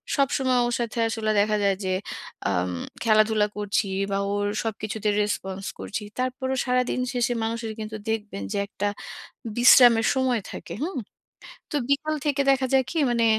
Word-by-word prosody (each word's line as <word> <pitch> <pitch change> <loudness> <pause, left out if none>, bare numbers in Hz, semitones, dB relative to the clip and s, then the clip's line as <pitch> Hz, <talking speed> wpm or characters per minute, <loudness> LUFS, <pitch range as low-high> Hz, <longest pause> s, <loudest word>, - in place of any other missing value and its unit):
সবসময় 265 -3 +2
ওর 240 - -2
সাথে 235 0 -3
আসলে 220 -1 -1
দেখা 210 +1 +1
যায় 195 -1 +3
যে 185 - 0 0.6
আম 90 -1 0 0.3
খেলাধুলা 215 -1 +4
করছি 205 0 0 0.3
বা 195 - +1 0.2
ওর 205 0 0 0.2
সবকিছুতে 215 -1 -2
রেসপন্স 195 -2 -3
করছি। 210 - -4 0.2
তারপরও 260 +1 -1
সারাদিন 250 0 +1
শেষে 245 0 +1
মানুষের 225 0 -3
কিন্তু 215 0 -5
দেখবেন 210 - -3
যে - - -1
একটা 205 0 -3 0.7
বিশ্রামের 240 -2 +7
সময় 255 -3 +1
থাকে। - - -7
হুম? 360 +1 -3 0.8
তো 295 - 0
বিকাল 310 +2 +1
থেকে 280 -1 +1
দেখা 270 -1 +2
যায় 265 -1 +4
কি, 330 - -2
মানে 235 -1 +2
225 Hz, 150 wpm, -25 LUFS, 210-255 Hz, 0.8 s, বিশ্রামের